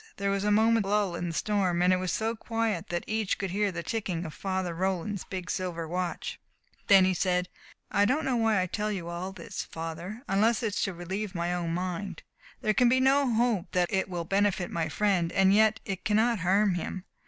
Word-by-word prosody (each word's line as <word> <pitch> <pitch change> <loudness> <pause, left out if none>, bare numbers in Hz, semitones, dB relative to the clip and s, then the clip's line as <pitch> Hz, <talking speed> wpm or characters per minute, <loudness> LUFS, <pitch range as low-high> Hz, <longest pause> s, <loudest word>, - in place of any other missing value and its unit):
There 200 0 0
was 195 0 0
a 210 - +1
moment's 220 0 +3
lull 205 -3 +1
in 175 +1 -3
the 165 - -4
storm, 185 -3 +1
and 180 +1 +5
it - - +3
was 185 -1 -2
so 225 +5 -1
quiet 225 -5 -2
that 175 0 -2
each 215 -2 -1
could 195 -3 -3
hear 205 +1 +1
the 170 -1 -5
ticking 185 -6 -3
of 155 - -6
Father 185 +1 -2
Roland's 190 +2 -2
big 185 -2 -6
silver 175 -3 -3
watch. 180 +1 -3 0.5
Then 195 -2 +7
he 185 - +2
said: 180 0 0 0.4
"I 200 - +4
don't 290 +9 +1
know 260 - +1
why 225 -3 +2
I 185 - +1
tell 210 +4 -2
you 175 -4 -4
all 175 +2 -4
this, 190 -4 -6
Father, 165 +8 -6
unless 220 +4 +2
it 215 -3 -1
is - - -1
to 195 - -3
relieve 190 +3 -4
my 170 +1 -1
own 170 -2 -2
mind. 180 0 -4 0.4
There 215 - +2
can 245 +2 +4
be 260 +2 +4
no 270 0 +3
hope 225 -5 +1
that 180 -1 +1
it 190 0 +1
will 175 -2 -3
benefit 195 -1 +1
my 165 -2 -1
friend. 185 -2 +1
And 195 0 +4
yet 220 +1 +4
it 190 -3 -4
cannot 220 +1 +2
harm 195 +3 +3
him. 180 +2 -4
195 Hz, 220 wpm, -28 LUFS, 175-215 Hz, 0.5 s, Then